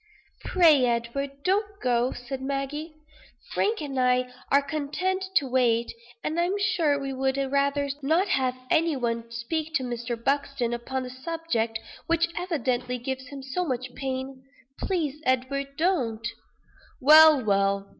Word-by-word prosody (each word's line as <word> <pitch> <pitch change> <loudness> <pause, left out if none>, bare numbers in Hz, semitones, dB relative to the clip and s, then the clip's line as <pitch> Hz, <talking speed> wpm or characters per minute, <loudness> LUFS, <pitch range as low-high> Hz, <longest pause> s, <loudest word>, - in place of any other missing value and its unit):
"Pray, 315 -8 +5
Edward, 235 +4 -1
don't 400 +2 0
go," 245 0 +1
said 245 +2 -6
Maggie. 280 +4 -3 0.6
"Frank 430 -5 0
and 275 -3 -3
I 250 0 +2 0.2
are 280 0 +5
content 310 +6 -2
to 285 - +4
wait; 240 -3 +2 0.3
and 315 +2 -1
I'm 360 +4 +1
sure 350 -7 +2
we 275 -1 -4
would 265 +1 0
rather 280 +1 +1
not 325 +8 +2
have 260 -5 +1 0.2
any 330 -2 +3
one 230 -2 -2
speak 310 +8 -3
to 265 - +2
Mr. 240 -1 -3
Buxton, 275 -1 -1
upon 255 +2 -3
a 250 - -7
subject 260 -5 -2 0.3
which 335 0 +2
evidently 255 -8 -1
gives 260 +1 -5
him 275 0 -8
so 270 +7 -2
much 255 -5 -3
pain; 265 0 -5 0.4
please, 310 -6 -2
Edward, 275 +2 -1
don't!" 250 -11 0 0.7
"Well, 305 -1 +8
well. 200 -1 +1
270 Hz, 140 wpm, -26 LUFS, 250-315 Hz, 0.7 s, Well